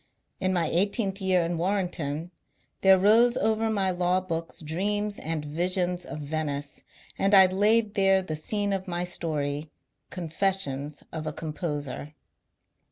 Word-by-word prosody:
In 185 Hz, -1 st, 0 dB
my 175 Hz, -3 st, +1 dB
eigh 175 Hz, +5 st, +3 dB
teenth 200 Hz, -2 st, -2 dB
year 185 Hz, -2 st, +2 dB
in 170 Hz, 0 st, -2 dB
Warrenton 175 Hz, -4 st, -2 dB, 0.5 s
there 190 Hz, 0 st, +6 dB
rose 230 Hz, +6 st, +4 dB
over 220 Hz, 0 st, +1 dB
my 195 Hz, -3 st, +1 dB
law 180 Hz, +1 st, +1 dB
books 165 Hz, -3 st, -5 dB
dreams 205 Hz, +6 st, -2 dB
and 155 Hz, -1 st, -3 dB
visions 180 Hz, +3 st, +1 dB
of 150 Hz, -, -7 dB
Venice, 145 Hz, -1 st, -3 dB, 0.4 s
and 195 Hz, +1 st, +4 dB
I 190 Hz, -1 st, +9 dB
laid 205 Hz, +3 st, +2 dB
there 195 Hz, -2 st, +3 dB
t^e 155 Hz, -4 st, -4 dB
scene 205 Hz, +6 st, -1 dB
of 190 Hz, -1 st, -3 dB
my 175 Hz, 0 st, -2 dB
story, 150 Hz, -4 st, -2 dB, 0.4 s
'^ -, -, -52 dB
Confessions 160 Hz, -5 st, 0 dB
of 155 Hz, -1 st, -5 dB
a -, -, 0 dB
Composer.' 150 Hz, -2 st, -5 dB
180 Hz, 150 wpm, -27 LUFS, 155-195 Hz, 0.5 s, I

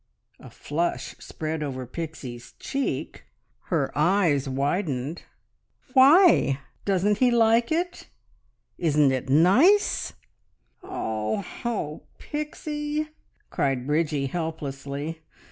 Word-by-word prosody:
A -, -, -12 dB
flush 170 Hz, +4 st, -3 dB
spread 155 Hz, 0 st, -4 dB
over 130 Hz, -3 st, -4 dB
Pixie's 125 Hz, -4 st, -7 dB
cheek; 275 Hz, 0 st, -3 dB, 0.4 s
her 145 Hz, -6 st, -1 dB
eyes 155 Hz, -4 st, +2 dB
widened. 140 Hz, +1 st, -1 dB, 0.7 s
"Why? 280 Hz, -, +6 dB, 0.3 s
Doesn't 200 Hz, +1 st, +2 dB
he 255 Hz, -, +5 dB
like 230 Hz, +1 st, +3 dB
it? 350 Hz, +2 st, -2 dB, 0.7 s
Isn't 150 Hz, -4 st, +3 dB
it 130 Hz, 0 st, -3 dB
nice?" 240 Hz, -, +4 dB, 0.7 s
"Oh 110 Hz, -, -3 dB, 0.2 s
oh, 205 Hz, -11 st, -3 dB
Pixie!" 300 Hz, 0 st, -4 dB, 0.4 s
cried 135 Hz, -3 st, 0 dB
Bridgie 150 Hz, -1 st, 0 dB
helplessly. 150 Hz, -1 st, -4 dB
160 Hz, 90 wpm, -25 LUFS, -, 0.7 s, Why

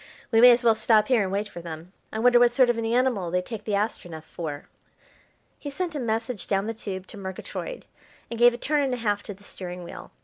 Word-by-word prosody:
We 225 Hz, -, +5 dB
may 250 Hz, -, +10 dB
as 240 Hz, 0 st, +4 dB
well 230 Hz, -1 st, +6 dB
stop 220 Hz, 0 st, +3 dB
here 250 Hz, -4 st, +4 dB
and 190 Hz, -2 st, -1 dB
wait 205 Hz, +2 st, -1 dB
for 175 Hz, -, -9 dB
them. 170 Hz, +2 st, -9 dB, 0.2 s
I -, -, -5 dB
wonder 245 Hz, +2 st, +5 dB
what 245 Hz, 0 st, +6 dB
sort 245 Hz, 0 st, +4 dB
of 235 Hz, -, -5 dB
an 225 Hz, -, -2 dB
animal 235 Hz, -6 st, +1 dB
they 180 Hz, +1 st, 0 dB
take 215 Hz, 0 st, -7 dB
the 210 Hz, -, 0 dB
Astronef 175 Hz, -6 st, -3 dB
for." 155 Hz, -3 st, -7 dB, 0.9 s
He 290 Hz, -, -6 dB
sent 335 Hz, +4 st, -3 dB
a 295 Hz, -, -3 dB
message 225 Hz, -2 st, -2 dB
down 195 Hz, 0 st, 0 dB
the 225 Hz, -, -3 dB
tube 190 Hz, -4 st, -6 dB
to 210 Hz, -, -12 dB
Murgatroyd 190 Hz, -, -6 dB, 0.5 s
and 230 Hz, -, -5 dB
gave 240 Hz, 0 st, +6 dB
a -, -, -7 dB
turn 295 Hz, +4 st, 0 dB
and 265 Hz, -3 st, 0 dB
a -, -, -7 dB
half 205 Hz, -3 st, -1 dB
to 205 Hz, -, -8 dB
the 200 Hz, -, -20 dB
steering 180 Hz, -3 st, -8 dB
wheel. 170 Hz, -, -10 dB
220 Hz, 245 wpm, -25 LUFS, 190-245 Hz, 0.9 s, may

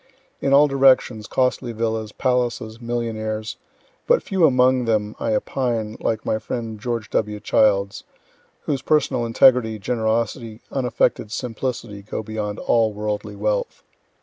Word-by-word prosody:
In 135 Hz, -, 0 dB
all 145 Hz, +2 st, +7 dB
directions 130 Hz, -5 st, +3 dB
costly 125 Hz, -2 st, 0 dB
villas, 110 Hz, -1 st, -2 dB
palaces, 120 Hz, -2 st, -1 dB
millionaires 110 Hz, -2 st, -3 dB, 0.5 s
(but -, -, +3 dB
few 190 Hz, -5 st, +3 dB
among 130 Hz, -1 st, +3 dB
them 105 Hz, -2 st, 0 dB
I 275 Hz, -, 0 dB
opine 120 Hz, -, -2 dB
like 110 Hz, -1 st, -2 dB
my 110 Hz, -, 0 dB
friend 110 Hz, -2 st, -5 dB
George 115 Hz, 0 st, -4 dB
W. 105 Hz, -1 st, -1 dB
Childs, 100 Hz, -2 st, +2 dB, 0.6 s
whose 140 Hz, -3 st, -2 dB
personal 130 Hz, -5 st, +1 dB
integrity, 115 Hz, -2 st, +4 dB
generosity, 110 Hz, +1 st, -2 dB
unaffected 125 Hz, -4 st, 0 dB
simplicity, 120 Hz, -4 st, -4 dB
go 105 Hz, +2 st, -5 dB
beyond 105 Hz, -1 st, -4 dB
all 115 Hz, -2 st, +2 dB
worldly 105 Hz, 0 st, -4 dB
wealth.) 105 Hz, 0 st, -2 dB
115 Hz, 125 wpm, -22 LUFS, 110-125 Hz, 0.6 s, all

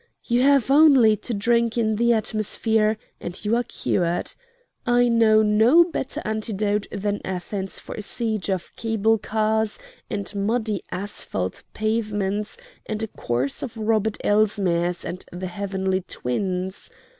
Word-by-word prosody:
You 240 Hz, +1 st, +1 dB
have 275 Hz, -1 st, +4 dB
only 275 Hz, -7 st, +7 dB
to 240 Hz, -, -6 dB
drink 235 Hz, +2 st, +1 dB
in 220 Hz, -2 st, +1 dB
the 235 Hz, +1 st, +3 dB
atmosphere 220 Hz, 0 st, +1 dB, 0.2 s
and 175 Hz, +4 st, -7 dB
you 215 Hz, +3 st, +2 dB
are 240 Hz, -, +2 dB
cured. 175 Hz, -6 st, -1 dB, 0.5 s
I 245 Hz, 0 st, +3 dB
know 225 Hz, -2 st, +5 dB
no 220 Hz, +10 st, +6 dB
better 335 Hz, -6 st, -4 dB
antidote 210 Hz, -1 st, -1 dB
than 205 Hz, 0 st, -2 dB
Athens 190 Hz, +1 st, -4 dB
for -, -, -8 dB
a -, -, -5 dB
siege 220 Hz, -2 st, -2 dB
of 185 Hz, -3 st, -3 dB
cable 225 Hz, -1 st, +1 dB
cars 220 Hz, 0 st, 0 dB, 0.3 s
and 200 Hz, +1 st, -4 dB
muddy 215 Hz, 0 st, -1 dB
asphalt 140 Hz, -, -4 dB
pavements 210 Hz, -, -1 dB, 0.3 s
and 215 Hz, 0 st, -3 dB
a -, -, -1 dB
course 125 Hz, -2 st, -2 dB
of 230 Hz, -, -6 dB
Robert 220 Hz, -1 st, +1 dB
Elsmeres 185 Hz, -5 st, +1 dB
and 185 Hz, -, -5 dB
the 180 Hz, +2 st, -5 dB
Heavenly 190 Hz, 0 st, -2 dB
Twins. 185 Hz, +8 st, -3 dB
215 Hz, 135 wpm, -23 LUFS, 195-225 Hz, 0.5 s, only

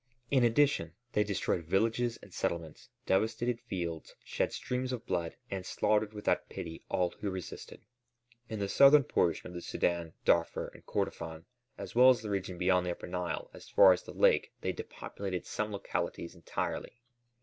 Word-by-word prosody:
In 130 Hz, -3 st, +4 dB
addition 140 Hz, +5 st, +3 dB, 0.2 s
they 105 Hz, -, +3 dB
destroyed 100 Hz, -4 st, -1 dB
villages 115 Hz, +6 st, +1 dB
and -, -, -14 dB
settlements, 80 Hz, -2 st, -3 dB, 0.2 s
devastated 110 Hz, +4 st, +1 dB
fields, 85 Hz, -4 st, -5 dB
shed -, -, -1 dB
streams 125 Hz, +1 st, -2 dB
of 125 Hz, -3 st, -4 dB
blood, 85 Hz, -1 st, -2 dB, 0.2 s
and 95 Hz, -1 st, -3 dB
slaughtered 105 Hz, +2 st, +1 dB
without 105 Hz, -1 st, -1 dB
pity 80 Hz, -1 st, -7 dB
all 90 Hz, -1 st, +1 dB
who 105 Hz, -, -2 dB
resisted. 95 Hz, -2 st, -7 dB, 0.7 s
In 110 Hz, -, -3 dB
the 100 Hz, -1 st, -1 dB
southern 140 Hz, +6 st, +7 dB
portion 85 Hz, -8 st, +1 dB
of 90 Hz, -, -8 dB
the 90 Hz, -, -4 dB
Sudân, 85 Hz, -1 st, -1 dB
Darfur, 85 Hz, -1 st, +2 dB
and -, -, -15 dB
Kordofân, 80 Hz, 0 st, -3 dB, 0.3 s
as -, -, -7 dB
well 125 Hz, +2 st, +8 dB
as 125 Hz, -3 st, +4 dB
the 105 Hz, -, -4 dB
region 95 Hz, -2 st, -2 dB
beyond 90 Hz, 0 st, +2 dB
the -, -, 0 dB
Upper -, -, -6 dB
Nile 90 Hz, -3 st, -3 dB
as -, -, -12 dB
far -, -, +8 dB
as -, -, -3 dB
the -, -, -10 dB
lake -, -, +3 dB
they -, -, 0 dB
depopulated 95 Hz, -3 st, -5 dB
some 105 Hz, 0 st, -3 dB
localities 90 Hz, -3 st, -3 dB
entirely. 90 Hz, +7 st, -4 dB
95 Hz, 170 wpm, -32 LUFS, 85-115 Hz, 0.7 s, well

